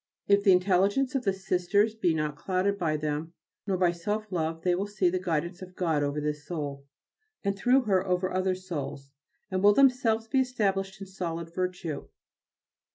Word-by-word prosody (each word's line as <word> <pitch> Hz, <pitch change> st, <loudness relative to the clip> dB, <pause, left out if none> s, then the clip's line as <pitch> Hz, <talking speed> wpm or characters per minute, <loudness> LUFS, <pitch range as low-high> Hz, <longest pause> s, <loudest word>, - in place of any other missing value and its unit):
If 200 Hz, 0 st, +4 dB
the 200 Hz, -, +6 dB
intelligence 195 Hz, +8 st, +3 dB
of 265 Hz, -3 st, -1 dB
the 195 Hz, -, +3 dB
Sisters 190 Hz, +3 st, +1 dB
be 180 Hz, -7 st, +1 dB
not 150 Hz, -1 st, -1 dB
clouded 190 Hz, +5 st, -1 dB
by 155 Hz, -3 st, +1 dB
them 155 Hz, +2 st, -3 dB, 0.3 s
nor 190 Hz, -2 st, +1 dB
by 180 Hz, -1 st, +3 dB
self 210 Hz, +5 st, -3 dB
love 165 Hz, -2 st, -2 dB
they 180 Hz, -, +3 dB
will 195 Hz, +3 st, -1 dB
see 195 Hz, -3 st, +1 dB
the 185 Hz, -, 0 dB
guidance 170 Hz, 0 st, -2 dB
of 185 Hz, 0 st, -10 dB
God 165 Hz, -5 st, +1 dB
over 145 Hz, +1 st, -1 dB
this 150 Hz, 0 st, -3 dB
soul, 145 Hz, -5 st, -5 dB, 0.6 s
and 200 Hz, -1 st, 0 dB
through 250 Hz, +7 st, +4 dB
her 195 Hz, -6 st, +2 dB
over 180 Hz, 0 st, 0 dB
other 185 Hz, 0 st, +1 dB
souls, 145 Hz, -7 st, -6 dB, 0.4 s
and 185 Hz, 0 st, 0 dB
will 205 Hz, +1 st, +6 dB
themselves 250 Hz, -5 st, +3 dB
be 265 Hz, +4 st, +2 dB
established 195 Hz, -6 st, 0 dB
in -, -, -5 dB
solid 170 Hz, -3 st, -5 dB
virtue. 180 Hz, -4 st, -3 dB
185 Hz, 180 wpm, -28 LUFS, 165-200 Hz, 0.6 s, the